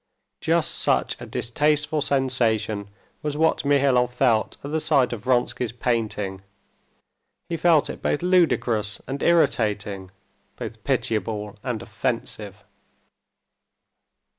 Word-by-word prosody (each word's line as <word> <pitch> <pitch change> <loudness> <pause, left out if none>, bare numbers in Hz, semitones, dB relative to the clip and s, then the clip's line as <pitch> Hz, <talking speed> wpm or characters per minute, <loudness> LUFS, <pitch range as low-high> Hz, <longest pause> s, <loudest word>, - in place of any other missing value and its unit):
Just - - +1
such - - +1
a - - -7
distasteful 150 +5 0
sensation 115 -7 0 0.3
was 150 -1 -3
what 160 +1 +2
Mihailov 135 -3 +3
felt 125 -3 +1
at 140 - -5
the 160 - +1
sight 140 -6 +2
of 105 -3 -6
Vronsky's 125 -1 +1
painting: 105 -5 -2 1.1
he 170 - -1
felt 165 -3 +4
it - - -7
both 145 - 0
ludicrous 125 - +2
and 135 +2 -5
irritating, 105 - +1 0.5
both 110 -1 -7
pitiable 110 -5 -1
and 120 -5 -3
offensive. 105 -2 -4
125 Hz, 110 wpm, -24 LUFS, 110-145 Hz, 1.1 s, felt